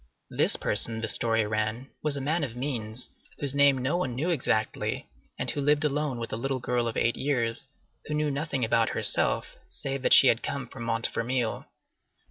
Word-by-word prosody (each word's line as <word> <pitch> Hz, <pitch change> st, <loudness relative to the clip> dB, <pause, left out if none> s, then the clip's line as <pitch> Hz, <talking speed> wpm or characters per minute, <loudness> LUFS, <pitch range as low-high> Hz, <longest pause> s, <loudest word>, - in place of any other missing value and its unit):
This -, -, +3 dB
person, 110 Hz, +2 st, 0 dB
the 115 Hz, -, -1 dB
story 115 Hz, -1 st, +1 dB
ran, 110 Hz, +4 st, -3 dB
was 150 Hz, -2 st, +2 dB
a -, -, -3 dB
man 155 Hz, +4 st, 0 dB
of 120 Hz, -4 st, -4 dB
means, 125 Hz, -3 st, -3 dB, 0.3 s
whose 140 Hz, -2 st, -2 dB
name 140 Hz, -1 st, +5 dB
no 130 Hz, +7 st, 0 dB
one 130 Hz, -9 st, -2 dB
knew 160 Hz, +8 st, -1 dB
exactly, 110 Hz, -8 st, -1 dB, 0.3 s
and -, -, +1 dB
who 145 Hz, -, -3 dB
lived 145 Hz, +2 st, +2 dB
alone 145 Hz, -2 st, -1 dB
with 115 Hz, -1 st, -5 dB
a -, -, -2 dB
little 135 Hz, +2 st, -2 dB
girl 120 Hz, -1 st, -1 dB
of 115 Hz, -, -3 dB
eight 120 Hz, -, +1 dB
years, 125 Hz, -3 st, -1 dB, 0.4 s
who 150 Hz, -, -2 dB
knew 150 Hz, -1 st, 0 dB
nothing 140 Hz, -3 st, -1 dB
about 115 Hz, 0 st, +2 dB
herself, -, -, +2 dB
save 135 Hz, 0 st, -4 dB
that -, -, +7 dB
she -, -, +9 dB
had 115 Hz, -2 st, +4 dB
come 140 Hz, -, -4 dB
from 120 Hz, -3 st, -8 dB
Montfermeil. 115 Hz, +1 st, -1 dB
130 Hz, 190 wpm, -27 LUFS, 115-140 Hz, 0.4 s, she